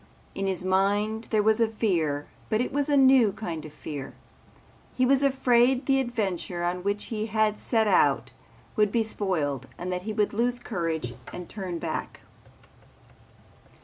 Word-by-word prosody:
In 195 Hz, 0 st, -2 dB
his 185 Hz, -2 st, -1 dB
mind 205 Hz, +4 st, +1 dB
there 215 Hz, -2 st, +2 dB
was 220 Hz, +2 st, +3 dB
a 230 Hz, -, +4 dB
fear 170 Hz, -10 st, 0 dB, 0.2 s
but 215 Hz, -, +1 dB
it 250 Hz, -, -1 dB
was 285 Hz, +1 st, +1 dB
a 290 Hz, -, +4 dB
new 260 Hz, -5 st, +6 dB
kind 170 Hz, -6 st, -5 dB
of 155 Hz, -, -9 dB
fear. 145 Hz, -2 st, -7 dB, 0.8 s
He 255 Hz, -, +3 dB
was 270 Hz, +1 st, +4 dB
afraid 260 Hz, -1 st, +3 dB
the 270 Hz, -1 st, +3 dB
adventure 195 Hz, -8 st, -2 dB
on 175 Hz, +1 st, -1 dB
which 200 Hz, +2 st, -1 dB
he 215 Hz, 0 st, -2 dB
had 215 Hz, -1 st, +1 dB
set 225 Hz, -3 st, +1 dB
out -, -, +3 dB, 0.4 s
would 210 Hz, -2 st, +3 dB
be 230 Hz, 0 st, +2 dB
spoiled, 175 Hz, -, -2 dB
that 180 Hz, 0 st, -3 dB
he 215 Hz, +4 st, -4 dB
would 210 Hz, 0 st, 0 dB
lose 240 Hz, +3 st, +1 dB
courage 165 Hz, -, -3 dB, 0.2 s
and 175 Hz, -1 st, -7 dB
turn 185 Hz, -4 st, -5 dB
back. -, -, -4 dB
210 Hz, 160 wpm, -27 LUFS, 180-235 Hz, 0.8 s, new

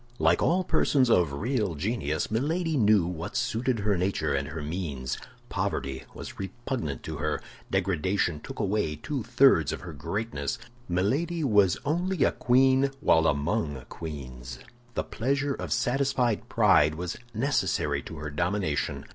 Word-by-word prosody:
Like -, -, +3 dB
all 185 Hz, +3 st, +3 dB
persons 130 Hz, -7 st, +3 dB
of 85 Hz, -8 st, +4 dB
real 105 Hz, -, -1 dB
genius, 80 Hz, -2 st, -1 dB
Milady 160 Hz, +8 st, 0 dB
knew 105 Hz, -, +4 dB
what 90 Hz, +6 st, -5 dB
suited 120 Hz, -1 st, 0 dB
her 100 Hz, 0 st, +2 dB
nature 90 Hz, -5 st, 0 dB
and 70 Hz, +1 st, -1 dB
her 80 Hz, 0 st, -5 dB
means. 75 Hz, -6 st, -3 dB, 0.3 s
Poverty 65 Hz, -1 st, -2 dB
was -, -, -8 dB
repugnant 95 Hz, -, -4 dB
to -, -, -5 dB
her; -, -, -1 dB, 0.3 s
degradation 90 Hz, -2 st, 0 dB
took -, -, -9 dB
away 100 Hz, -6 st, 0 dB
two 140 Hz, -, -4 dB
thirds 120 Hz, -, +4 dB
of -, -, -5 dB
her -, -, -8 dB
greatness. 100 Hz, -10 st, -3 dB, 0.3 s
Milady 145 Hz, -, 0 dB
was 105 Hz, -, +4 dB
only 175 Hz, +3 st, +1 dB
a -, -, +4 dB
queen 130 Hz, +2 st, +4 dB
while 80 Hz, -, +4 dB
among 75 Hz, -, -1 dB
queens. 65 Hz, -6 st, -7 dB, 0.4 s
The -, -, 0 dB
pleasure 140 Hz, +4 st, -1 dB
of -, -, -6 dB
satisfied 125 Hz, -1 st, +1 dB
pride 75 Hz, +1 st, +4 dB
was 85 Hz, +1 st, -4 dB, 0.2 s
necessary 135 Hz, +6 st, +1 dB
to 80 Hz, -, -9 dB
her 75 Hz, -1 st, -5 dB
domination. 85 Hz, 0 st, -1 dB
100 Hz, 145 wpm, -28 LUFS, 80-130 Hz, 0.4 s, of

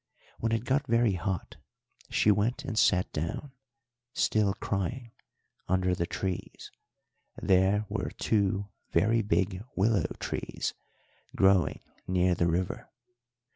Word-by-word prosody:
When 115 Hz, -, 0 dB
it 115 Hz, +1 st, 0 dB
got 135 Hz, +2 st, +1 dB
very 115 Hz, -2 st, +3 dB
hot 90 Hz, 0 st, -3 dB, 0.5 s
she 105 Hz, -, +4 dB
went 115 Hz, +7 st, 0 dB
and 125 Hz, -, -3 dB
sat 90 Hz, -4 st, +3 dB
down, 85 Hz, -, -3 dB, 0.6 s
still 105 Hz, -2 st, +2 dB
crying, 115 Hz, +5 st, -3 dB, 0.6 s
under 95 Hz, 0 st, +2 dB
the 85 Hz, -1 st, -1 dB
trees; 95 Hz, -1 st, -4 dB, 0.7 s
there 95 Hz, +3 st, +3 dB
were 100 Hz, -2 st, -2 dB
two 100 Hz, -1 st, 0 dB, 0.2 s
very 110 Hz, +7 st, +3 dB
big 100 Hz, -2 st, 0 dB
willow 100 Hz, -3 st, +2 dB
trees -, -, -3 dB, 0.6 s
growing 95 Hz, -5 st, +3 dB, 0.3 s
near 90 Hz, 0 st, +3 dB
the 85 Hz, 0 st, +1 dB
river. 90 Hz, +2 st, -2 dB
100 Hz, 115 wpm, -29 LUFS, 90-110 Hz, 0.7 s, she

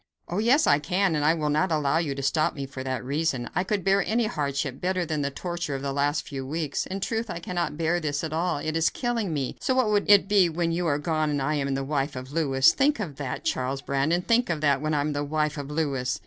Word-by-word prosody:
"Oh, 175 Hz, -, -2 dB
yes 255 Hz, +8 st, +4 dB
I 145 Hz, -, +4 dB
can, 180 Hz, +4 st, +1 dB
and 150 Hz, -, 0 dB
I 155 Hz, +3 st, +4 dB
will 150 Hz, -2 st, -1 dB
not 165 Hz, +5 st, +1 dB
allow 150 Hz, 0 st, +2 dB
you 150 Hz, -5 st, -2 dB
to 140 Hz, -, -5 dB
stop 155 Hz, +3 st, +1 dB
me 140 Hz, -1 st, -4 dB
for 130 Hz, -1 st, -7 dB
that 130 Hz, -2 st, -3 dB
reason. 140 Hz, -3 st, -1 dB
I 180 Hz, -, +1 dB
could 195 Hz, 0 st, -1 dB
bear 195 Hz, 0 st, +3 dB
any 230 Hz, +1 st, +1 dB
hardship 140 Hz, -7 st, -2 dB
better 180 Hz, -1 st, 0 dB
than 155 Hz, -2 st, -2 dB
the 140 Hz, -, 0 dB
torture 170 Hz, 0 st, -4 dB
of 135 Hz, -, -5 dB
the 140 Hz, -1 st, -2 dB
last 145 Hz, +2 st, 0 dB
few 135 Hz, -2 st, -5 dB
weeks. 150 Hz, +1 st, -3 dB
In 190 Hz, +1 st, -4 dB
truth, 225 Hz, +2 st, -2 dB
I 175 Hz, -, -4 dB
cannot 170 Hz, -3 st, -3 dB
bear 165 Hz, +2 st, +1 dB
this 145 Hz, -3 st, -2 dB
at 155 Hz, -1 st, -3 dB
all; 170 Hz, 0 st, 0 dB
it 155 Hz, +2 st, -3 dB
is 165 Hz, 0 st, +3 dB
killing 235 Hz, -6 st, -2 dB
me, 140 Hz, -4 st, -3 dB
so 260 Hz, -, +1 dB
what 250 Hz, -5 st, +2 dB
would 205 Hz, -1 st, +1 dB
it 200 Hz, -2 st, +7 dB
be 195 Hz, -4 st, +4 dB
when 165 Hz, +1 st, -1 dB
you 170 Hz, +1 st, -1 dB
are 145 Hz, -2 st, +2 dB
gone 155 Hz, 0 st, 0 dB
and 145 Hz, -1 st, 0 dB
I 135 Hz, +3 st, 0 dB
am 140 Hz, -2 st, -1 dB
the 135 Hz, -, -2 dB
wife 140 Hz, 0 st, -1 dB
of 130 Hz, +1 st, -7 dB
Louis? 135 Hz, -5 st, +4 dB
Think 285 Hz, 0 st, +2 dB
of 160 Hz, -10 st, -5 dB
that, 135 Hz, -3 st, -5 dB
Charles 135 Hz, +2 st, -1 dB
Brandon; 145 Hz, +6 st, 0 dB
think 235 Hz, +2 st, +2 dB
of 165 Hz, -3 st, 0 dB
that, 140 Hz, -2 st, +2 dB
when 155 Hz, 0 st, 0 dB
I 145 Hz, -, +2 dB
am 150 Hz, +1 st, -1 dB
the 145 Hz, 0 st, -1 dB
wife 150 Hz, 0 st, -1 dB
of 145 Hz, -1 st, -6 dB
Louis. 140 Hz, -5 st, -1 dB
155 Hz, 270 wpm, -26 LUFS, 140-175 Hz, -, it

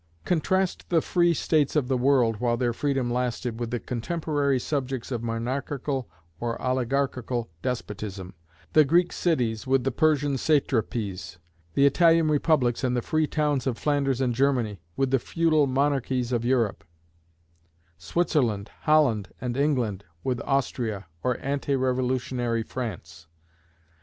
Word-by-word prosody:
Contrast 185 Hz, +2 st, 0 dB
the 170 Hz, -, +4 dB
free 175 Hz, +2 st, +2 dB
states 155 Hz, -3 st, +1 dB
of 145 Hz, -5 st, +2 dB
the 130 Hz, -, +1 dB
world, 125 Hz, -3 st, +3 dB
while 120 Hz, +1 st, 0 dB
their 120 Hz, -1 st, 0 dB
freedom 135 Hz, -2 st, -1 dB
lasted, 125 Hz, -1 st, -2 dB
with 120 Hz, -1 st, -3 dB
the 120 Hz, +1 st, -2 dB
cotemporary 145 Hz, +2 st, -1 dB
subjects 135 Hz, -2 st, -3 dB
of 120 Hz, -3 st, -2 dB
monarchical 130 Hz, +3 st, -3 dB, 0.3 s
or 120 Hz, -1 st, -3 dB
oligarchical 130 Hz, -3 st, -1 dB
despotism: 105 Hz, -6 st, -4 dB, 0.4 s
the 155 Hz, -, +7 dB
Greek 175 Hz, +5 st, +2 dB
cities 125 Hz, -10 st, 0 dB
with 135 Hz, -1 st, +3 dB
the 135 Hz, -, 0 dB
Persian 145 Hz, -1 st, +2 dB
satrapies; 115 Hz, -, 0 dB, 0.4 s
the 140 Hz, -, +5 dB
Italian 165 Hz, +2 st, +4 dB
republics 145 Hz, -5 st, +2 dB
and 125 Hz, -1 st, +1 dB
the 120 Hz, -, -1 dB
free 155 Hz, -1 st, +1 dB
towns 145 Hz, -4 st, 0 dB
of 120 Hz, -3 st, -1 dB
Flanders 140 Hz, -3 st, 0 dB
and 125 Hz, -2 st, +1 dB
Germany, 120 Hz, -, +1 dB, 0.2 s
with 135 Hz, -1 st, +1 dB
the 135 Hz, -, +3 dB
feudal 155 Hz, +1 st, +2 dB
monarchies 130 Hz, -2 st, 0 dB
of 120 Hz, -2 st, 0 dB
Europe; 120 Hz, -4 st, +1 dB, 1.2 s
Switzerland, 115 Hz, -, 0 dB
Holland, 135 Hz, -, +3 dB
and 125 Hz, -1 st, -3 dB
England, 125 Hz, -9 st, 0 dB, 0.2 s
with 125 Hz, -3 st, -1 dB
Austria 120 Hz, -7 st, -1 dB, 0.2 s
or 125 Hz, -1 st, 0 dB
ante 140 Hz, 0 st, -1 dB
revolutionary 125 Hz, -2 st, 0 dB
France. 85 Hz, -10 st, -6 dB
130 Hz, 135 wpm, -26 LUFS, 120-145 Hz, 1.2 s, the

